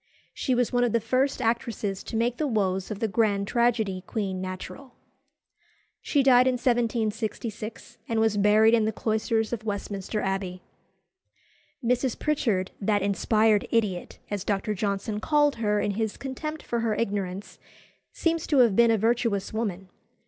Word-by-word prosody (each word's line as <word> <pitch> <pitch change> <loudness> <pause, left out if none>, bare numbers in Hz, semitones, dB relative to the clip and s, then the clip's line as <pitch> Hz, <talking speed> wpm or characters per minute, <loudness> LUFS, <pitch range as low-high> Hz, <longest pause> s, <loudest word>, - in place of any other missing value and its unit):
She 255 - 0
was 245 0 0
one 245 0 +3
of 240 - +1
the 230 - +3
first 260 +3 0
actresses 225 -4 -1
to - - -6
make 235 +2 0
the 305 - 0
woes 190 -6 0
of 215 - -4
the 225 +1 -1
grand 200 -1 +1
tragedy 220 -6 +1
queen 195 -5 -3
natural. 185 +8 -7 1.1
She 285 -3 +1
died 255 -1 +6
in 260 - +3
1766, 230 -2 -2
and 225 -1 +1
was 220 -1 +2
buried 210 +2 +5
in 225 -2 +4
the 220 - +1
cloisters 220 +1 -1
of 225 -2 -4
Westminster 205 0 -3
Abbey. 190 -2 -3 1.2
Mrs. 250 +1 +1
Pritchard, 220 -11 0
that 205 0 +1
"inspired 210 +1 +2
idiot," 210 -6 -1
as 205 -2 -2
Dr. 205 +1 -1
Johnson 200 +1 -2
called 295 +1 +2
her 210 -2 +1
in 205 - 0
his 220 +1 -2
contempt 305 +4 -5
for 235 - -2
her 225 -2 0
ignorance, 200 -3 -3 0.5
seems 330 -1 -1
to 290 - +2
have 235 -6 +5
been 235 +1 +5
a 225 - +4
virtuous 225 -2 0
woman. 195 -4 -3
220 Hz, 155 wpm, -26 LUFS, 200-240 Hz, 1.2 s, died